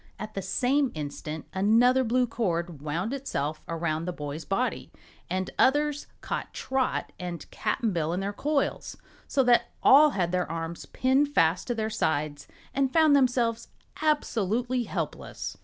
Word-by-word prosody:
At 215 0 -7
the 195 - -3
same 255 +8 +1
instant 150 +1 -5
another 230 +7 +4
blue 250 +1 +2
cord 175 - -2
wound 170 - -2
itself 155 - -3
around 165 -1 -2
the 180 - -2
boy's 150 -1 -6
body, 220 +9 -2 0.4
and 185 0 -2
others 290 +2 +2
caught - - -4
Trot 265 -1 -1
and 175 -2 -5
Cap'n 225 -6 -1
Bill 165 -2 0
in 180 - -1
their 200 +1 -2
coils, 290 +6 -1 0.3
so 270 - +2
that 245 -1 +4
all 300 +3 +8
had 180 -10 -1
their 180 -2 0
arms 165 0 -5
pinned 265 +3 +2
fast 165 +3 +3
to 240 - -1
their 220 -1 -2
sides 150 -5 -1 0.3
and 270 -1 +1
found 315 -2 +5
themselves 245 -4 +2 0.3
absolutely 245 -5 0
helpless. - - -5
215 Hz, 150 wpm, -27 LUFS, 170-260 Hz, 0.4 s, all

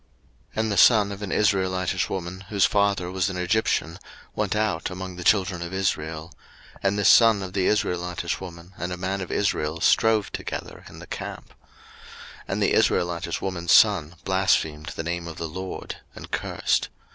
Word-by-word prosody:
03:024:010 110 - 0
And 110 - -1
the 100 - -1
son 105 0 +6
of 100 +1 -7
an 100 - -4
Israelitish 95 -3 +1
woman, 95 +1 -5
whose 100 -3 +3
father 100 -3 +1
was 95 +1 0
an 95 - -5
Egyptian, 90 -3 0 0.3
went - - -1
out 105 -6 0
among 95 0 -6
the 90 - -7
children 95 -2 +2
of 85 +2 -5
Israel: 80 -4 -2 0.5
and 100 +1 +1
this 100 - +2
son 115 -4 +6
of 95 -1 -7
the 95 -2 +1
Israelitish 90 -4 -1
woman 90 0 -10
and 90 +1 -3
a 90 - -4
man 95 +2 -2
of 90 - -6
Israel 80 -5 0
strove 110 +2 +3
together - - -6
in - - -13
the - - -10
camp; - - -7
03:024:011 - - -24 0.9
And - - -1
the - - +2
Israelitish 85 -1 +1
woman's 85 -3 -2
son 90 -7 +5
blasphemed 80 -5 +1
the - - -4
name 85 +1 -3
of 80 - -8
the 80 - -3
Lord, 95 +4 -6 0.2
and - - -10
cursed. - - 0
95 Hz, 180 wpm, -25 LUFS, 85-100 Hz, 0.9 s, son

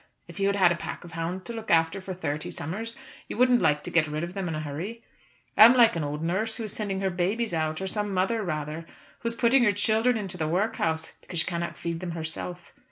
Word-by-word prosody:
If - - -10
you 195 - +2
had 200 - +2
had 185 -3 +5
a - - +2
pack - - -6
of 175 - -11
hounds 170 +3 -3
to 235 - -6
look 225 -1 -7
after 165 +3 +3
for 185 0 -6
thirty 150 -4 -3
summers, 215 +10 -4 0.3
you - - -5
wouldn't 250 0 +5
like 150 0 +2
to - - -6
get 165 -2 +3
rid 150 +2 -3
of 175 +1 -5
them 195 -2 -3
in 165 - -2
a - - -2
hurry. 170 +11 -5 0.5
I'm 230 +4 +9
like 235 -4 +6
an 165 - -1
old 150 +2 -3
nurse 195 +7 0
who 230 - -4
is 215 -1 -3
sending 195 -3 -2
her 190 -1 +1
babies 190 +5 0
out, 155 -1 -1
or 190 - -3
some 205 +1 -2
mother, 195 +5 +1
rather, 155 -2 -4 0.3
who 235 - -4
is 230 - -1
putting 240 +2 +4
her 210 - +5
children 220 +4 +2
into 195 -4 -5
the 155 - 0
workhouse 165 -3 0
because 175 - -8
she - - -3
cannot 170 -1 -3
feed 170 -1 -3
them 175 -1 -4
herself. 170 +2 -5
185 Hz, 250 wpm, -27 LUFS, 165-215 Hz, 0.5 s, I'm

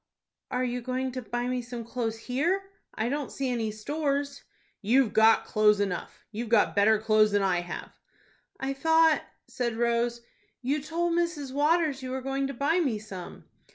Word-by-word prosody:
"Are 255 -1 -1
you 245 0 -2
going 255 +1 -2
to 255 0 -5
buy 240 +2 -3
me 250 0 -1
some 240 -1 -7
clothes 230 -2 -3
here? 340 +12 -1 0.2
I 220 - -1
don't 285 +1 -2
see 270 -2 -2
any 230 -3 -1
stores." 280 +5 -2 0.4
"You've 240 +3 +3
got 220 +1 +5
clothes 210 -1 +3
enough. 195 -4 -3
You've 225 +1 -5
got 225 -2 +3
better 210 +2 +5
clothes 215 -1 +3
than 205 -1 +3
I 180 -2 +2
have." 175 - -7 0.7
"I 270 +1 -2
thought," 320 +2 +4 0.3
said 235 -3 -3
Rose, 235 0 0 0.4
"you 280 +4 0
told 335 +3 -1
Mrs. 335 -6 -1
Waters 300 -1 +2
you 255 - -5
were 260 +1 -3
going 270 0 -1
to 275 - -5
buy 295 +7 +1
me 270 -10 +1
some." 195 -4 -9
250 Hz, 175 wpm, -28 LUFS, 220-280 Hz, 0.7 s, got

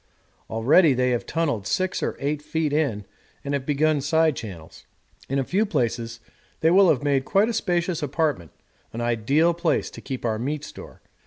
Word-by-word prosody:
Already 135 +7 +4
they 125 0 +1
have 120 - -2
tunnelled 145 -12 -1
6 185 - -1
or - - -2
8 145 +1 -2
feet 155 -1 -2
in 130 -10 0 0.4
and 140 - -2
have 140 -2 -2
begun 150 0 +2
side 160 +1 +2
channels. 90 -9 -10 0.4
In 135 - 0
a 135 - +1
few 190 +10 +1
days 120 - -2 0.4
they 160 - +4
will 190 0 +6
have 140 -2 +2
made 140 -2 +1
quite 200 - +2
a - - -1
spacious 175 -5 -1
apartment 145 - -1 0.4
an 115 - -4
ideal 120 +9 +2
place 170 -1 0
to - - -10
keep 130 -3 -6
our 110 -2 0
meat 145 +4 -3
store. - - -11
145 Hz, 180 wpm, -24 LUFS, 120-160 Hz, 0.4 s, will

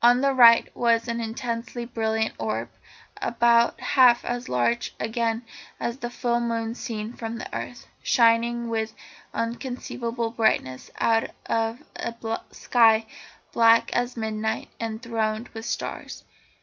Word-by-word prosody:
On 245 +1 +6
the 275 0 +3
right 235 -3 +7
was 230 -1 +2
an 235 0 -2
intensely 235 +1 -4
brilliant 220 -2 -1
orb, 115 +1 -2 0.5
about 235 0 +3
half 250 -3 +4
as 245 0 -3
large 120 -1 0
again 225 +1 -1 0.4
as 235 +1 -3
the 240 - -4
full 240 0 0
moon 230 -1 -2
seen 225 -2 -5
from 230 -1 -5
the - - -7
earth, 245 - -6 0.2
shining 235 0 +3
with 225 -1 -2 0.4
inconceivable 235 -1 -3
brightness 220 - 0
out 225 0 +2 0.2
of 225 +1 -1
a 235 - -4 0.3
sky 225 -2 +3 0.5
black 230 0 +5
as 245 0 -1
midnight 220 0 -2
and 225 +1 -4
thronged 225 -1 -2
with 225 0 -8
stars. - - -5
230 Hz, 130 wpm, -25 LUFS, 225-240 Hz, 0.5 s, right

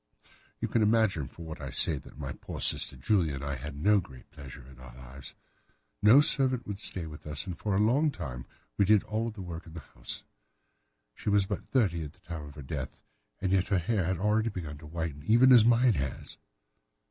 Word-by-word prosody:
"You - - -1
can 115 - +1
imagine 105 - +2
from 85 +6 -11
what 80 -1 -8
I - - -5
say 75 -4 0
that - - -15
my 70 -3 -5
poor - - -8
sister - - 0
Julia 80 - +1
and 70 - -6
I 70 0 -2
had 70 +2 -6
no 105 +7 +4
great 65 -8 -12
pleasure 70 -3 -11
in 65 -1 -15
our 60 -1 -12
lives. 65 +2 -10 0.7
No 110 +7 +8
servant 130 -4 +3
would 100 -1 -5
stay 90 -5 -2
with 75 -1 -10
us, 75 -1 -4
and 90 - -5
for 100 +3 -2
a - - +2
long 130 +9 +3
time 65 - -6 0.3
we 100 - +5
did 105 0 +5
all 110 +2 -2
the 105 -4 -8
work 85 -1 -7
of 80 - -12
the - - -5
house. - - -4 0.9
She 105 - -4
was 100 -1 +4
but - - -5
thirty 95 -11 +1
at 75 0 -8
the - - -25
time 85 -3 -7
of 70 0 -12
her 75 - -9
death, 65 - -5 0.4
and 95 -2 -1
yet 95 -1 +2
her 100 - +2
hair 95 +2 0
had 95 +1 0
already 105 +4 +1
begun 80 -8 -6
to 75 - -11
whiten, 80 -2 -4
even 120 - +5
as 120 -4 +8
mine 120 0 +5
has." 70 -6 -4
85 Hz, 220 wpm, -29 LUFS, 75-105 Hz, 0.9 s, No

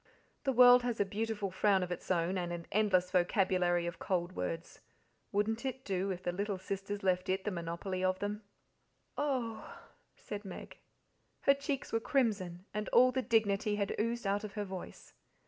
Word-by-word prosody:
The 270 - +3
world 250 0 +8
has 240 -2 -2
a 205 - +3
beautiful 210 -1 -2
frown 190 0 +3
of 180 - -5
its 175 - -5
own, 175 0 +1
and 175 -2 -2
an 170 -1 -5
endless 185 -4 +2
vocabulary 180 -1 +2
of 170 0 -5
cold 175 -2 -1
words 165 +1 -4 0.5
wouldn't 220 +3 0
it 265 -1 -4
do 190 0 -1
if 185 -1 -4
the 175 - 0
little 200 +2 -2
sisters 195 +2 -4
left 185 0 +1
it 190 +1 0
the 210 - -1
monopoly 175 +2 -3
of 185 0 +2
them?" 205 +2 -3 0.7
"Oh 245 -7 -1
h - - -10
h!" - - -14 0.5
said 205 0 -4
Meg. 190 -3 -9 0.6
Her 275 - +6
cheeks 280 -2 -4
were 225 - +3
crimson, 205 - 0
and 210 0 -3
all 255 +1 +6
the 260 +1 0
dignity 210 -3 +2
had 200 -1 -1
oozed 230 +1 -1
out 200 +1 0
of 210 -2 -6
her 210 0 -3
voice. 190 -2 -8
200 Hz, 185 wpm, -33 LUFS, 185-225 Hz, 0.7 s, world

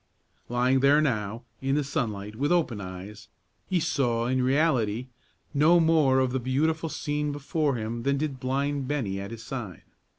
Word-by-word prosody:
Lying 125 +2 +2
there 140 +3 +5
now, 115 -5 -1 0.2
in 135 +1 +1
the 150 - +1
sunlight, 105 -7 -3
with 145 +7 0
open 155 -12 +1
eyes, 95 +2 -8 0.4
he 185 -2 +2
saw, 120 -7 0
in 130 +1 +1
reality, 130 -4 +1 0.4
no 155 +5 +5
more 160 -5 +4
of 130 -1 +2
the 130 - 0
beautiful 155 +6 0
scene 150 0 -2
before 145 0 -1
him 115 +1 -3
than 140 +3 +1
did 140 -3 -3
blind 140 +1 -1
Bennie 115 -10 -2
at 100 - -6
his 115 0 -8
side. 110 -7 -6
130 Hz, 165 wpm, -27 LUFS, 115-145 Hz, 0.4 s, there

